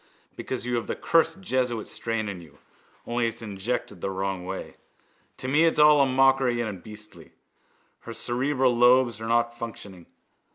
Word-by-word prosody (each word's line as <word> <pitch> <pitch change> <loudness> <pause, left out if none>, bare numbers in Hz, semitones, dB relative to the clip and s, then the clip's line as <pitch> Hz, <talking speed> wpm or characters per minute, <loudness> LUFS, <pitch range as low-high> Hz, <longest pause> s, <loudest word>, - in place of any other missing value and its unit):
Because 125 -2 -4
you 125 -1 0
have 115 - -4
the - - -2
cursed 165 +3 +1
jesuit 125 - -1
strain 115 -2 -2
in 95 -3 -6
you, 75 -3 -17 0.5
only 120 0 0
it's 115 0 -5
injected 100 -2 -4
the - - -2
wrong 95 -1 -3
way. 95 +1 -6 0.6
To 130 - -4
me 150 +5 +4
it's 165 - +2
all 150 -1 +6
a 135 - +4
mockery 130 -2 +3
and 105 -6 -4
beastly. 105 +1 -12 0.7
Her 115 - -9
cerebral 130 +1 0
lobes 120 -2 +4
are 110 - -4
not 120 0 +1
functioning. 100 -6 -9
120 Hz, 165 wpm, -26 LUFS, 105-130 Hz, 0.7 s, all